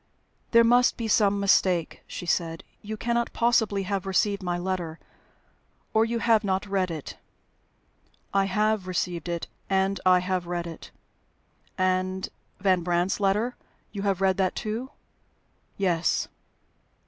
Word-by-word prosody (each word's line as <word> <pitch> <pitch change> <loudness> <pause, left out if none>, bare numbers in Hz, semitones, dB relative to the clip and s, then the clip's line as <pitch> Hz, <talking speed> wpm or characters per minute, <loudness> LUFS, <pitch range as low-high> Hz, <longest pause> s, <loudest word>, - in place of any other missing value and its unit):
"There 230 0 +6
must 245 +2 +4
be 230 -2 -3
some 205 -2 +3
mistake," 185 -4 +2
she - - -6
said. 165 -1 -1 0.2
"You 215 +1 -6
cannot 235 +1 -1
possibly 220 -4 +2
have 195 0 -2
received 200 +2 +1
my 175 -1 -1
letter, 175 -3 -3 1.0
or 220 +1 +4
you 235 +1 -1
have 225 -1 +3
not 190 0 0
read 195 -2 0
it?" 160 -4 -7 1.1
"I 195 0 +3
have 210 0 +1
received 175 -1 -2
it, 170 -1 -2 0.2
and 195 0 +1
I 185 -1 +6
have 180 -1 -1
read 175 -1 -2
it." 165 -1 -9 0.9
"And 185 0 0 0.3
Van 185 -2 +3
Brandt's 175 +3 0
letter 210 +5 +1 0.4
you 200 - -5
have 195 -2 0
read 190 -1 +3
that 190 -2 +1
too?" 225 +5 -3 0.9
"Yes." 175 -4 +1
195 Hz, 135 wpm, -26 LUFS, 180-210 Hz, 1.1 s, There